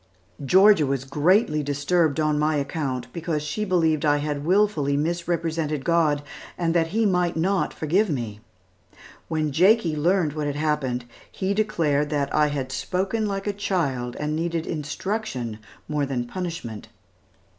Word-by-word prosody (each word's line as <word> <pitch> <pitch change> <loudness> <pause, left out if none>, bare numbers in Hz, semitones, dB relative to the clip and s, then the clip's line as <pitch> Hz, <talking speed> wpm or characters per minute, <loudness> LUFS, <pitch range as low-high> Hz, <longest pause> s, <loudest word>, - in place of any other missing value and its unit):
Georgia 190 +4 +6
was 135 -1 -1
greatly 150 - +2
disturbed 145 +2 +1
on 155 -1 +1
my 155 +1 +2
account, 140 -3 -2
because 165 -3 -2
she 150 +8 -3
believed 165 -6 +2
I 145 -1 +3
had 145 -1 -3
wilfully 165 -6 +2
misrepresented 165 -2 -1
God, 155 -4 +2 0.3
and 165 -2 0
that 165 -1 +2
He 220 +6 0
might 180 -4 +1
not 190 +4 +1
forgive 180 +7 +1
me. 115 -8 -3 0.9
When 155 -2 -1
Jakie 180 +1 +4
learned 165 0 +1
what 150 -1 -2
had 145 - -2
happened, 145 -5 -1 0.3
he 190 +1 -1
declared 160 -9 +1
that 145 -2 -1
I 150 - +4
had 135 -3 -3
spoken 195 +9 -1
like 195 -1 -3
a 205 - -1
child, 140 -12 -1
and 150 +1 -1
needed 165 0 -2
instruction 150 - -3 0.3
more 150 -2 -1
than 125 -3 -2
punishment. 165 - -6
155 Hz, 145 wpm, -24 LUFS, 145-180 Hz, 0.9 s, Georgia